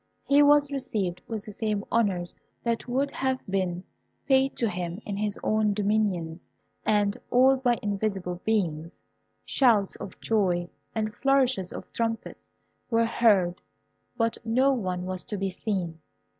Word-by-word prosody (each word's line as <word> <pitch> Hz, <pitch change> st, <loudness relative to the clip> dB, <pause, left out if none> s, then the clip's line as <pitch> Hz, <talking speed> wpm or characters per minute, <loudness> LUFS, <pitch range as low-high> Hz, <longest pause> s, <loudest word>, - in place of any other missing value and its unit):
He 285 Hz, +1 st, +5 dB
was 290 Hz, 0 st, +5 dB
received 200 Hz, -10 st, -2 dB
with 220 Hz, -2 st, -5 dB
the 210 Hz, -, -7 dB
same 210 Hz, -1 st, -2 dB
honours 190 Hz, -6 st, +1 dB, 0.3 s
that 235 Hz, 0 st, -1 dB
would 270 Hz, +3 st, 0 dB
have 260 Hz, -1 st, -1 dB
been 185 Hz, -2 st, -1 dB, 0.4 s
paid 270 Hz, 0 st, +3 dB
to 235 Hz, -, +1 dB
him 180 Hz, -2 st, -4 dB
in 205 Hz, -, -3 dB
his 210 Hz, 0 st, -2 dB
own 215 Hz, -1 st, +2 dB
dominions, 200 Hz, -5 st, 0 dB, 0.4 s
and 205 Hz, -1 st, +2 dB
all 260 Hz, +2 st, +5 dB
by 245 Hz, -2 st, +2 dB
invisible 195 Hz, -3 st, -2 dB
beings. 170 Hz, -7 st, -1 dB, 0.5 s
Shouts 225 Hz, -7 st, +3 dB
of 190 Hz, -, -9 dB
joy 180 Hz, -6 st, +1 dB, 0.3 s
and 215 Hz, -1 st, -1 dB
flourishes 260 Hz, -6 st, +2 dB
of -, -, -9 dB
trumpets 225 Hz, -1 st, -3 dB, 0.4 s
were 230 Hz, -1 st, +3 dB
heard, 200 Hz, -7 st, +3 dB, 0.6 s
but 230 Hz, -1 st, 0 dB
no 255 Hz, +5 st, +3 dB
one 185 Hz, -7 st, -2 dB
was 185 Hz, -1 st, -4 dB
to 210 Hz, -, -4 dB
be 195 Hz, 0 st, -1 dB
seen. 180 Hz, -4 st, -3 dB
210 Hz, 145 wpm, -27 LUFS, 185-235 Hz, 0.6 s, He